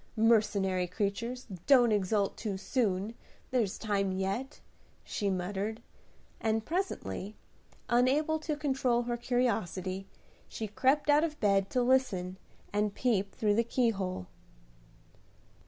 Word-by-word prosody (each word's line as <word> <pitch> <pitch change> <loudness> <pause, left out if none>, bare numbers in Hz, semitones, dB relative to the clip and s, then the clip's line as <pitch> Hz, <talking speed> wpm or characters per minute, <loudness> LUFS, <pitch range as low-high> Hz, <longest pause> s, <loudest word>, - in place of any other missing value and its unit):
Mercenary 210 -5 +3
creatures, 220 +6 -3 0.2
don't 245 -5 +6
exult 200 0 +1
too 205 -4 -3
soon! 205 -1 0 0.4
there's 230 -7 +1
time 200 -3 0
yet," 195 +8 -3 0.4
she 205 - -2
muttered; 195 +4 -2 0.6
and 220 0 0
presently, 215 - -3 0.5
unable 280 +6 +3
to 305 -1 -3
control 265 -5 +1
her 240 0 -2
curiosity, 200 -6 -1 0.4
she 220 - -5
crept 265 +8 +2
out 295 +1 +5
of 310 -2 -2
bed 195 -2 +2
to 250 - +1
listen 235 -8 +1 0.3
and 210 0 0
peep 205 -6 0
through 210 -2 +2
the 230 +3 +3
keyhole. 200 - 0
220 Hz, 115 wpm, -31 LUFS, 195-250 Hz, 0.6 s, don't